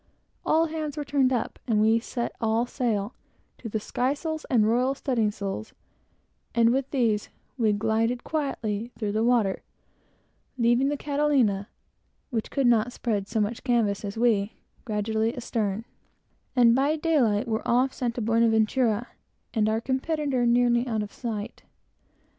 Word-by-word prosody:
All 325 +1 +3
hands 310 -2 -4
were 295 - -3
turned 275 -2 +2
up, 245 -3 -2
and 220 -3 +2
we 220 +2 +4
set 235 +1 -4
all 225 +1 +1
sail, 235 -4 -2 0.5
to 230 - -6
the 220 - -2
skysails 290 +8 -2
and 235 -4 +4
the - - +2
royal 250 +4 +2
studding 240 -6 0
sails; 195 - -5 0.8
and 230 0 +5
with 270 0 -1
these, 225 -6 0 0.3
we 225 -5 +2
glided 225 +4 0
quietly 235 -7 -2
through 210 -3 -2
the 215 +2 0
water, 230 -5 +2 1.0
leaving 240 +2 +3
the 290 - -1
Catalina, 275 -9 +1 0.6
which 225 -3 -2
could 275 -2 0
not 240 0 +3
spread 210 -5 -2
so 225 0 -1
much 215 +2 -2
canvas 230 -6 +1
as 205 +1 -5
we, 220 -3 +2 0.3
gradually 220 +1 -1
astern, 225 -3 -2 0.7
and, 240 -2 +6
by 275 +5 +2
daylight, 265 -9 +1
were 220 -1 -1
off 255 +3 +2
St. 240 -2 -2
Buenaventura, 230 0 +2 0.5
and 215 -2 +2
our 220 +1 -1
antagonist 265 -2 0
nearly 240 0 +3
out 220 -3 -1
of 205 - -9
sight. 215 -4 -5
235 Hz, 145 wpm, -26 LUFS, 215-260 Hz, 1.0 s, and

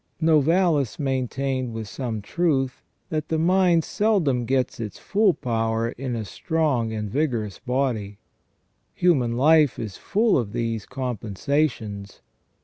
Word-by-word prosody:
Novalis 160 - +3
maintained, 130 -2 -2
with 110 -1 -5
some 115 -3 -4
truth, 135 -3 0 0.3
that 155 -1 -2
the 160 - 0
mind 175 0 +3
seldom 170 - +1
gets 130 -1 0
its 105 -4 -5
full 205 0 +2
power 115 -4 -1
in 125 0 -4
a 110 -2 -3
strong 140 - 0
and 105 -1 -3
vigorous 115 - -1
body. 120 -6 -2 0.8
Human 130 -10 +2
life 150 0 +4
is 105 -4 -5
full 215 - +2
of 105 -4 -4
these 115 -2 -2
compensations. 120 -3 -2
130 Hz, 125 wpm, -24 LUFS, 115-155 Hz, 0.8 s, life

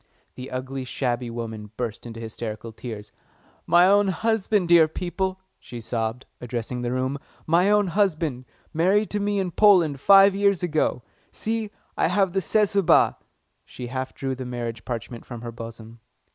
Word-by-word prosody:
The 130 +1 -8
ugly, 130 +1 -4
shabby 125 -1 -2
woman 110 -2 -6
burst 120 -1 -4
into 115 -1 -8
hysterical 115 0 -6
tears. 110 -2 -8 0.6
"My 175 +1 +6
own 200 +1 +4
husband, 210 -1 +1
dear 170 -2 +6
people," 185 +3 -3 0.2
she 120 - -9
sobbed, 115 +1 -3 0.2
addressing 125 0 -4
the 120 0 -2
room. 130 +2 -1 0.3
"My 175 +5 +3
own 210 0 +4
husband 160 -9 0 0.3
married 190 +6 +2
to 210 - -1
me 205 0 0
in 190 -2 -1
Poland 175 -9 +4
five 195 +4 +7
years 200 -2 +2
ago. 155 -7 0 0.3
See, 220 -1 -3 0.3
I - - +2
have 185 +1 +1
the 195 - +1
Cesubah!" 200 -1 +3 0.5
She 125 - -9
half 130 0 -4
drew 135 -1 -3
the 130 0 -6
marriage 120 -2 -5
parchment 120 -1 -5
from 120 -2 -9
her 120 -1 -6
bosom. 115 0 -10
135 Hz, 160 wpm, -24 LUFS, 120-190 Hz, 0.6 s, five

